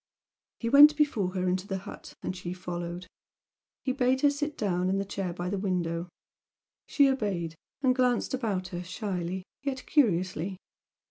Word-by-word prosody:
He 230 - -2
went 290 +4 +8
before 215 -11 +1
her 185 0 0
into 185 +2 0
the 195 - -2
hut, 200 +2 -10
and 185 - -3
she 180 -1 -5
followed. 175 0 -5 0.8
He 260 - 0
bade 260 0 +2
her 290 - +5
sit 295 +1 -3
down 185 -3 0
in 195 - +1
the 195 - -1
chair 195 -2 -3
by 175 +1 -4
the 195 +1 -1
window, 175 -3 -1 0.8
she 285 -2 +5
obeyed, 200 -11 -1 0.3
and 255 -1 +4
glanced 250 -2 +1
about 205 -8 -1
her 175 0 -5
shyly, 185 -1 -3 0.2
yet 270 -2 -3
curiously. 185 - +1
195 Hz, 160 wpm, -29 LUFS, 180-255 Hz, 0.8 s, went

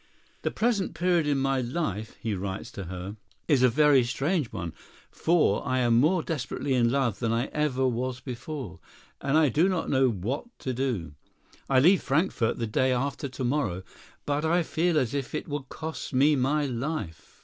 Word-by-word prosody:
"The - - 0
present 215 -7 0
period 170 -1 +2
in 145 -1 +2
my 135 -1 +1
life," 120 - -3
he 110 -2 -2
writes 95 +1 -4
to 100 - -7
her, 90 +4 -6 0.3
"is 145 -5 +4
a 130 - +6
very 140 0 +5
strange 140 +3 -1
one, 85 -6 -5 0.4
for 170 0 +2
I 130 -2 0
am 120 -2 +4
more 160 +5 +3
desperately 145 -2 -2
in 120 -2 +3
love 125 -4 0
than 115 -2 0
I 115 +3 0
ever 135 -4 +1
was 125 +1 -2
before, 125 - -6 0.4
and 140 +2 +2
I 155 -3 +5
do 160 +10 +3
not 180 -3 -1
know 130 -1 +4
what 115 - -3 0.2
to 130 - -2
do. 120 - -2 0.6
I 135 -1 +5
leave 180 +7 +5
Frankfort 140 - +1
the 115 - -1
day 130 +4 +1
after 140 +2 -1
to 130 0 -6
morrow, 120 -9 0 0.4
but 145 +1 0
I 170 +2 +2
feel 165 +1 +1
as 130 -4 +1
if 140 -1 -3
it - - -4
would 145 -3 -5
cost 160 -2 -6
me 145 +3 +5
my 145 +3 +1
life. 125 - -5
135 Hz, 185 wpm, -27 LUFS, 120-150 Hz, 0.6 s, a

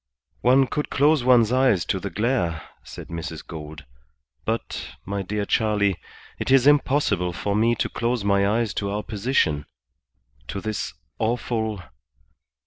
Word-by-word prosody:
"One 130 +2 +5
could 150 +3 -3
close 145 0 +3
one's 120 -3 +5
eyes 125 -8 +3
to 95 - -1
the 100 - -4
glare," 95 - -1 0.2
said - - -10
Mrs. 80 -2 -6
Gould. 75 -2 -9 0.6
"But, 115 +1 -3
my 100 +1 -2
dear 105 +2 -2
Charley, 105 -3 +2 0.4
it - - -3
is 135 -1 +5
impossible 140 -11 +3
for 100 +4 -2
me 115 +3 +3
to 110 - -1
close 120 -1 -1
my 100 0 +3
eyes 110 0 0
to 100 - -2
our 105 +1 -2
position; 100 - 0 0.8
to 100 - -4
this 105 -2 -4 0.2
awful 110 -2 -1
105 Hz, 140 wpm, -24 LUFS, 95-125 Hz, 0.8 s, One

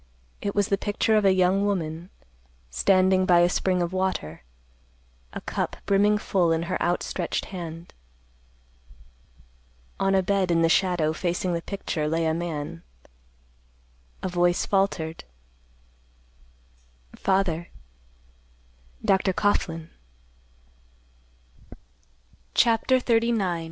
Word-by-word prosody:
It 200 - -3
was 205 -1 +1
the 200 - +1
picture 210 +1 +1
of 210 -1 +3
a 195 - +6
young 185 +1 +2
woman, 170 -4 -2 0.6
standing 185 - +3
by 175 -2 +5
a 175 - +5
spring 180 0 0
of 175 +1 -4
water, 185 - -2 0.9
a - - -7
cup - - -3
brimming 205 +1 +3
full 185 -5 +1
in 165 0 +1
her 185 +2 -3
outstretched 175 0 -1
hand. 170 -1 -7 2.1
On 195 0 +2
a 190 - +3
bed 195 -1 +1
in 165 -1 +3
the 165 - +3
shadow, 170 -4 +2
facing 175 +2 -2
the 170 - -2
picture, 170 -5 -3
lay 165 +1 0
a 160 - +1
man. 155 - -4 1.4
A - - 0
voice 175 -1 +1
faltered, 190 -5 -1 1.9
"Father. 190 -4 0 1.4
Dr. 190 -1 +2
Coughlan." 165 -5 -1 2.6
CHAPTER 235 +3 +3
XXXIX. 225 -7 +1
185 Hz, 105 wpm, -25 LUFS, 165-195 Hz, 2.6 s, a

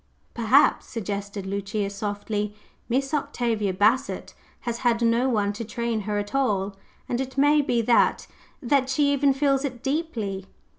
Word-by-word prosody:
"Perhaps," 245 +5 +4
suggested 200 -2 -4
Lucia 200 +1 -2
softly, 205 +1 -3 0.3
"Miss 270 +4 0
Octavia 230 -8 0
Bassett 220 +9 +1 0.3
has 235 -1 -3
had 235 -2 +2
no 235 +3 +3
one 205 -4 +1
to 215 - -5
train 230 0 -2
her 210 - 0
at 205 +3 -4
all; 205 -7 0 0.3
and 245 +1 -1
it 265 +1 -6
may 295 +2 +5
be 240 -4 0
that 235 +1 +3 0.4
that 265 +1 +2
she 285 +1 +2
even 280 0 +3
feels 275 0 +2
it 255 -4 -5
deeply." 235 - -2
235 Hz, 150 wpm, -25 LUFS, 205-270 Hz, 0.4 s, may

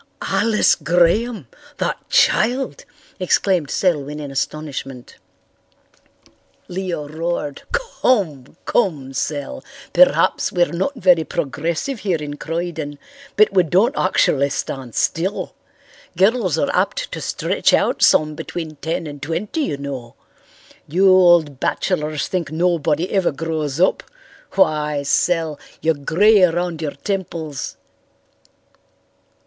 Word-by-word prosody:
"Alice 225 -2 +3
Graham! 175 - +1 0.3
That - - -1
child!" 245 +7 +2 0.3
exclaimed 185 -3 +1
Selwyn 150 -5 0
in 145 -2 -6
astonishment. 135 -3 -5 1.5
Leo 175 -5 -4
roared. 155 -2 -3
"Come, 200 - -1
come, 150 - 0
Sel, 145 +1 -3 0.3
perhaps - - +4
we're 175 -1 +2
not 190 +12 -1
very 180 -7 +4
progressive 165 - -3
here 190 -5 0
in 145 -1 -6
Croyden, 165 -3 -4 0.4
but 210 -1 +4
we 190 - +5
don't 190 - +2
actually 140 -6 +2
stand 130 -4 -5
still. 185 +5 -1 0.6
Girls 195 - +2
are 145 - 0
apt - - 0
to - - -5
stretch - - 0
out - - +2
some 155 0 +4
between 155 0 -6
ten 165 +3 -3
and 145 -2 -8
twenty, 165 - -3
you 150 - -2
know. 135 -4 -7 0.7
You 185 +6 +3
old 175 -7 +5
bachelors 155 -5 -1
think 170 -5 -3
nobody 165 0 0
ever 190 -3 +2
grows 155 -1 -3
up. 185 - +3 0.5
Why, 150 -6 +1
Sel, 160 +1 +1 0.2
you're 160 - +2
grey 190 +9 +3
around 175 -1 +1
your 150 -3 -3
temples." 170 -7 -4
165 Hz, 110 wpm, -20 LUFS, 150-185 Hz, 1.5 s, we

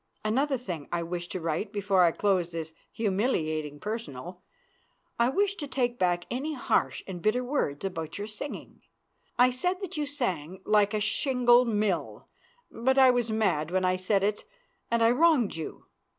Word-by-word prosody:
Another 270 +6 +1
thing 175 - -6
I 170 -1 -1
wish 175 +1 -4
to 185 - -5
write 165 +5 -2
before 200 -2 +2
I 170 -2 +5
close 180 -3 0
this 160 -1 -5 0.2
humiliating 160 - -1
personal. 180 - -6 0.8
I 235 +1 +4
wish 400 +7 +1
to 290 - -5
take 245 -3 -1
back 175 -1 +1
any 295 +5 -2
harsh 250 - 0
and 180 -3 -7
bitter 225 +6 +1
words 220 - -2
about 165 -5 -4
your 205 - -4
singing. 215 +7 -7 0.6
I 250 +1 +5
said 360 +9 -1
that 385 - -6
you 295 -1 -1
sang 190 - -3
like 210 0 +3
a - - +1
shingle 245 +2 +3
mill, 210 -5 -1 0.4
but 265 +3 +1
I 260 -1 +8
was 245 -2 0
mad 205 -9 +1
when 185 +1 +1
I 185 0 +2
said 190 +2 +1
it, 205 +1 0 0.5
and 235 -1 +2
I 225 - +5
wronged 290 -5 +3
you. 160 -1 -7
210 Hz, 170 wpm, -28 LUFS, 175-250 Hz, 0.8 s, I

